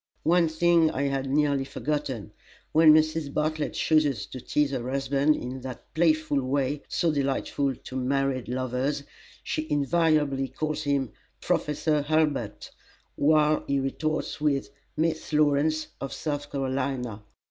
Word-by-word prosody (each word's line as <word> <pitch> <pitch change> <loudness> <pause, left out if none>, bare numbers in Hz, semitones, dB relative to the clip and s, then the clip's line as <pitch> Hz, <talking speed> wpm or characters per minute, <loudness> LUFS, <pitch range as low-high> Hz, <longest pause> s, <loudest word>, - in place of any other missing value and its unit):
One 170 +1 +4
thing 165 0 +3
I 140 -3 -2
had 135 -1 -1
nearly 140 -1 +2
forgotten. 140 -6 -3 0.4
When 160 0 +7
Mrs. 155 -1 +2
Bartlett 155 +1 -1
chooses 145 -9 +2
to 130 - -9
tease 150 +2 +1
her 125 -2 -3
husband 140 +2 +2
in 130 +1 -6
that 125 -2 -9
playful 155 -3 +2
way 135 +2 -1
so 170 - +1
delightful 140 -1 -1
to 130 - -11
married 130 0 0
lovers, 130 +3 -1 0.4
she 155 0 -3
invariably 145 -2 +2
calls 155 +2 -3
him 140 -3 0 0.3
"Professor 150 0 0
Hurlbut," 145 -7 -1 0.4
while 155 +1 +3
he 140 0 +1
retorts 155 +3 -2
with 140 -2 0 0.3
"Miss 160 0 -1
Lawrence, 150 +1 +2
of 135 - -4
South 145 -1 -4
Carolina." 130 -5 -2
145 Hz, 130 wpm, -27 LUFS, 135-155 Hz, 0.4 s, When